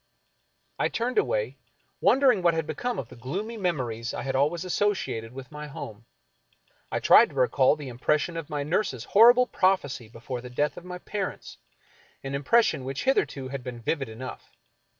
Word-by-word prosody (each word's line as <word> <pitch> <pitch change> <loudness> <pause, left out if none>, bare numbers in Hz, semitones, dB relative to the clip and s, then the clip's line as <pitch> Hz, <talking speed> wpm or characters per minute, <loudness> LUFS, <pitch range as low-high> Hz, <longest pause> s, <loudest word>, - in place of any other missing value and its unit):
I - - +2
turned 245 - 0
away, - - -1 0.4
wondering 260 -7 +4
what 170 -1 +3
had 160 -1 -1
become 245 +7 -3
of 120 - -5
the - - -12
gloomy 185 - -4
memories 130 - -2
I - - -4
had 135 -1 -2
always 150 +6 +1
associated 185 - -1
with 130 +1 -10
my 150 0 -7
home. 115 -5 -9 0.9
I - - 0
tried - - +7
to - - -14
recall 130 - +3
the 150 -3 -8
impression 150 +7 0
of 165 -2 -5
my 145 -2 -2
nurse's 150 - -1
horrible 240 - +6
prophecy 145 - 0
be 115 - -13
fore 120 +1 -5
the 125 - -9
death 145 +4 0
of 175 - -10
my 180 0 -6
parents 195 +1 -5 0.3
— - - -31
an 135 0 -5
impression 150 - +2
which 135 +1 -4
hitherto 140 - 0
had 135 -1 -5
been 125 -2 -6
vivid 135 +2 -2
enough. 125 +4 -9
150 Hz, 180 wpm, -27 LUFS, 130-190 Hz, 0.9 s, tried